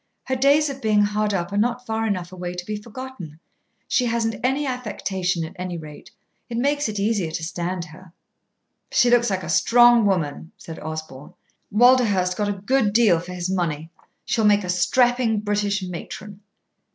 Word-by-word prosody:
"Her 260 Hz, -, -2 dB
days 280 Hz, +4 st, +4 dB
of 275 Hz, -1 st, -6 dB
being 215 Hz, -2 st, +3 dB
hard 210 Hz, 0 st, 0 dB
up 175 Hz, -1 st, -2 dB
are -, -, -1 dB
not 245 Hz, +3 st, 0 dB
far 225 Hz, -1 st, -1 dB
enough 180 Hz, -4 st, -3 dB
away 180 Hz, -1 st, -6 dB
to 180 Hz, 0 st, -6 dB
be 210 Hz, -, -3 dB
forgotten. 210 Hz, -, -9 dB, 0.5 s
She 250 Hz, -, +1 dB
hasn't 225 Hz, -1 st, -1 dB
any 270 Hz, +3 st, +1 dB
affectation, 195 Hz, -8 st, -2 dB
at 160 Hz, -, -11 dB
any 180 Hz, -1 st, -4 dB
rate. 150 Hz, -2 st, -11 dB, 0.4 s
It 230 Hz, -, -4 dB
makes 285 Hz, +1 st, +1 dB
it 210 Hz, -, -5 dB
easier 200 Hz, -4 st, 0 dB
to 160 Hz, +1 st, -5 dB
stand 175 Hz, +1 st, -3 dB
her." 170 Hz, +2 st, -15 dB, 0.8 s
"She 245 Hz, -, +4 dB
looks 240 Hz, 0 st, +4 dB
like 190 Hz, -1 st, -2 dB
a -, -, -6 dB
strong 240 Hz, -2 st, +5 dB
woman," 165 Hz, -4 st, -2 dB
said 165 Hz, -, -9 dB
Osborn. 155 Hz, -3 st, -8 dB, 0.4 s
"Walderhurst 210 Hz, -6 st, +4 dB
got 205 Hz, +1 st, -1 dB
a -, -, 0 dB
good 205 Hz, +2 st, 0 dB
deal 215 Hz, -7 st, +4 dB
for 180 Hz, +2 st, -8 dB
his 175 Hz, 0 st, -3 dB
money. 165 Hz, -4 st, -2 dB, 0.3 s
She'll 230 Hz, -2 st, 0 dB
make 205 Hz, -1 st, +4 dB
a 180 Hz, -, -6 dB
strapping 240 Hz, +4 st, +2 dB
British 205 Hz, -1 st, -1 dB
matron." 190 Hz, +3 st, -8 dB
205 Hz, 175 wpm, -23 LUFS, 180-240 Hz, 0.8 s, strong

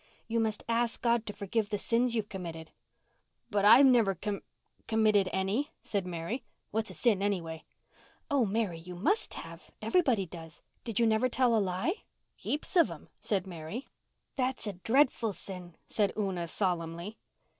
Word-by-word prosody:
"You 230 Hz, 0 st, 0 dB
must 220 Hz, -2 st, 0 dB
ask 235 Hz, 0 st, +1 dB
God 235 Hz, -1 st, +1 dB
to -, -, -2 dB
forgive 205 Hz, +2 st, -1 dB
the 210 Hz, -, 0 dB
sins 235 Hz, +3 st, +1 dB
you've 215 Hz, -2 st, 0 dB
committed. 165 Hz, -5 st, -7 dB, 0.8 s
"But 205 Hz, -1 st, +2 dB
I've 235 Hz, +6 st, +9 dB
never 230 Hz, -7 st, +5 dB
com—committed 210 Hz, +1 st, 0 dB
any," 195 Hz, +9 st, 0 dB
said 200 Hz, -4 st, -2 dB
Mary. 175 Hz, +9 st, -3 dB, 0.3 s
"What's 220 Hz, +2 st, 0 dB
a -, -, -6 dB
sin 220 Hz, -6 st, +3 dB
any 200 Hz, -2 st, +1 dB
way?" 165 Hz, -1 st, -8 dB, 0.6 s
"Oh, 280 Hz, -3 st, +3 dB
Mary, 205 Hz, -5 st, 0 dB
you 180 Hz, +2 st, -9 dB
must 400 Hz, -, 0 dB
have. -, -, -9 dB
Everybody 260 Hz, -, +2 dB
does. 165 Hz, -2 st, -10 dB, 0.2 s
Did 230 Hz, -3 st, -2 dB
you 235 Hz, -, +5 dB
never 225 Hz, +3 st, +3 dB
tell 245 Hz, -1 st, +3 dB
a 220 Hz, -, +4 dB
lie?" 190 Hz, -, -1 dB, 0.3 s
"Heaps 300 Hz, +6 st, -2 dB
of 340 Hz, -, +6 dB
'em," -, -, -10 dB
said 195 Hz, -3 st, 0 dB
Mary. 175 Hz, -, -6 dB, 0.5 s
"That's 255 Hz, -2 st, -1 dB
a 205 Hz, -, -2 dB
dreadful 230 Hz, +2 st, +2 dB
sin," 180 Hz, -3 st, -8 dB
said 205 Hz, -3 st, +1 dB
Una 190 Hz, -5 st, -1 dB
solemnly. 175 Hz, +2 st, -2 dB
210 Hz, 160 wpm, -31 LUFS, 185-235 Hz, 0.8 s, I've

